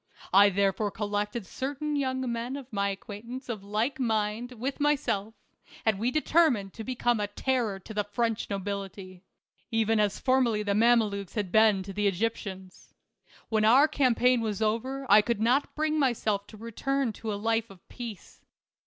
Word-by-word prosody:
I 200 +1 +8
therefore 200 +2 +1
collected 210 +2 -3
certain 285 - -3
young 260 -2 -1
men 235 +3 -3
of 270 -4 -9
my 200 -1 +1
acquaintance 225 +6 -7
of 215 -4 -4
like 215 +7 -1
mind 225 0 -1
with 255 +5 -4
my 295 0 +4
self, 220 -4 -3 0.5
and 220 -3 +2
we 235 +3 +1
determined 290 - +2
to 225 - -7
become 240 -1 0
a 205 - -1
terror 230 -1 -1
to 220 - -10
the 210 0 0
French 225 +2 -2
nobility, 195 -2 -5 0.5
even 225 -1 +1
as 205 -2 +1
formerly 250 -5 +2
the 205 -1 0
Mama 230 +2 +5
lukes 200 -2 -6
had 205 -5 -2
been 215 -3 +4
to 195 +1 -8
the 205 +1 +1
Egyptians. 190 -2 -4 0.5
When 220 -1 +1
our 255 +7 +6
campaign 250 -4 +3
was 215 -3 -2
over 235 +5 -1
I 210 +1 +7
could 235 0 -1
not 245 +6 +1
bring 310 0 0
myself 215 -7 0
to 215 - -13
return 235 +3 -2
to 220 +1 -5
a - - -2
life 225 +2 0
of 190 -3 -17
peace. 230 -6 -9
220 Hz, 170 wpm, -28 LUFS, 205-250 Hz, 0.5 s, I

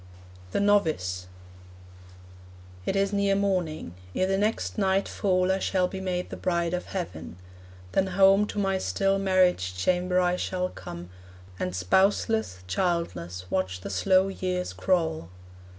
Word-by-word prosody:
THE - - 0
NOVICE 155 - +1 1.6
It - - 0
is 195 +1 +1
near 200 -1 +2
morning. 180 - -1 0.2
Ere 185 - +2
the 195 +1 +1
next 210 +2 -1
night 195 0 +2
fall 185 -1 +1
I 190 - +1
shall 185 -1 +1
be 190 +1 -6
made 180 -1 -3
the - - -5
bride 170 -1 0
of 180 - -2
heaven. 90 - -6 0.5
Then 195 - +2
home 195 +2 +5
To - - -7
my 195 -2 +1
still 195 +1 +1
marriage 180 - +2
chamber 180 - +1
I 180 0 +2
shall 180 0 -2
come, 85 - -9 0.5
And 90 0 -2
spouseless, 190 - +1
childless, 90 - -2
watch 90 -1 -1
the 100 - -6
slow 185 - +3
years 185 -1 -3
crawl. 160 - 0
185 Hz, 140 wpm, -27 LUFS, 155-195 Hz, 1.6 s, home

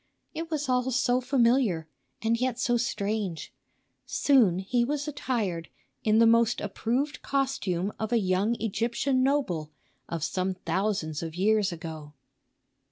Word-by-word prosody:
It 325 +1 -5
was 300 -2 -2
all 250 0 +1
so 250 0 +2
familiar, 240 - +2 0.4
and 225 +1 +2
yet 255 -2 0
so 245 -1 +1
strange. 205 -6 -2 0.5
Soon 240 -11 +4
he 235 +6 +1
was 290 +3 -2
attired 220 - -2 0.3
in 215 0 +3
the 230 - +6
most 230 0 +4
approved 245 +8 -2
costume 210 -9 -1
of 220 0 -3
a 240 - +4
young 195 +2 +1
Egyptian 235 +5 0
noble 255 - 0 0.4
of 165 -3 -3
some 185 +2 -1
thousands 180 -3 -1
of 165 -1 -5
years 205 +1 +2
ago. 160 -3 -8
225 Hz, 135 wpm, -28 LUFS, 185-255 Hz, 0.5 s, the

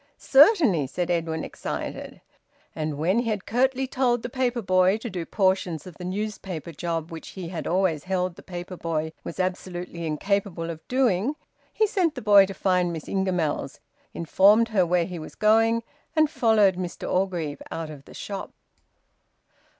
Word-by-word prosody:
"Certainly," 270 - +5
said 175 +6 -2
Edwin, 165 -2 -1
excited. - - -6 0.5
And 155 -2 -3
when 180 +9 +2
he 240 -1 -1
had 210 -3 -2
curtly 265 +3 +1
told 250 -3 0
the 245 - -4
paper 245 -2 -1
boy 185 +1 +3
to 225 0 -6
do 175 -3 -4
portions 185 -5 0
of 180 -4 -11
the - - -6
newspaper 185 -3 -4
job 165 +1 -3
which 165 -1 -8
he 180 -3 -5
had 170 -2 -5
always 175 -4 +1
held 185 -1 -1
the - - -12
paper 175 0 -7
boy 160 -2 -2
was 170 - -7
absolutely 180 -2 -3
incapable 170 +1 -1
of 160 - -8
doing, 250 0 +1 0.4
he 435 - +2
sent 370 -7 0
the 250 - -5
boy 200 -2 +7
to 195 - -6
find 180 -2 +1
Miss 160 -2 -6
Ingamells, 180 -8 -1 0.3
informed 205 +7 +4
her 190 -5 +2
where 175 0 +2
he 180 -2 -6
was 155 - -9
going, 225 +2 +3 0.3
and 310 -1 +3
followed 215 - +3
Mr 180 -1 -5
Orgreave 180 -6 -1
out 160 -1 -5
of 140 -2 -11
the - - -14
shop. 200 -2 -6
185 Hz, 165 wpm, -25 LUFS, 170-220 Hz, 0.5 s, boy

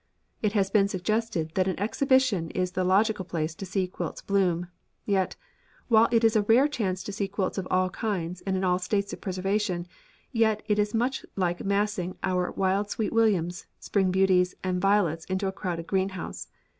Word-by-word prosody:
It 210 -2 +1
has 195 -3 +1
been 200 -2 +4
suggested 200 -3 -1
that 185 0 +1
at 190 - 0
an - - -8
exhibition 230 -5 +2
is 180 0 -1
the 185 0 -1
logical 200 +2 +2
place 165 -3 -3
to 195 +3 -8
see 190 0 0
quilts 180 -2 -5
bloom. 180 -3 +1 0.4
Yet, 195 -2 0 0.5
while 225 -1 +6
it 230 -1 +3
is 225 0 +4
a 215 - +5
rare 230 +7 +4
chance 190 -10 -2
to 205 - -5
see 200 0 -2
quilts 195 0 -2
of 185 - -4
all 185 0 +2
kinds 180 -5 -3
and 190 -1 +1
in 190 - -2
all 180 -1 +2
states 200 +2 -1
of - - -8
preservation, 190 -1 -1 0.5
yet 220 -3 +2
it 210 -1 +1
is 210 +1 0
much 250 +4 0
like 175 -2 -1
massing 200 -2 -1
our 180 -1 0
wild 195 +2 0
Sweet 220 +1 -2
Williams, 190 -6 +1
Spring 195 -2 +1
Beauties, 185 -1 +3
and 180 -1 -1
Violets 185 -5 +2
in 190 - -1
a 190 - 0
crowded 175 -4 -4
greenhouse. 190 0 -2
195 Hz, 190 wpm, -27 LUFS, 180-210 Hz, 0.5 s, while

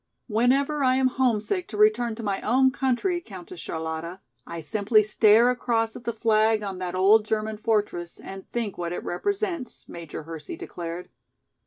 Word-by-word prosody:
"Whenever 270 +6 +2
I 255 -1 +4
am 260 0 +3
homesick 255 - 0
to 210 - -7
return 215 +2 +3
to 230 - -7
my 200 -2 -1
own 260 +3 +3
country, 270 +8 0
Countess 185 - -10
Charlotta, 160 +2 -5 0.3
I 170 0 -6
simply 215 +6 +2
stare 215 +3 +5
across 230 -2 -1
at 245 - -10
the 235 - 0
flag 220 -1 +2
on 195 -2 -5
that 180 -1 -4
old 205 +4 +5
German 215 0 -2
fortress 210 -6 -1
and 195 0 -10
think 225 -6 -3
what 170 0 -3
it - - -5
represents," 370 - -3
Major 165 -2 -8
Hersey 160 -2 -7
declared. 170 +1 -7
215 Hz, 165 wpm, -25 LUFS, 185-245 Hz, 0.3 s, stare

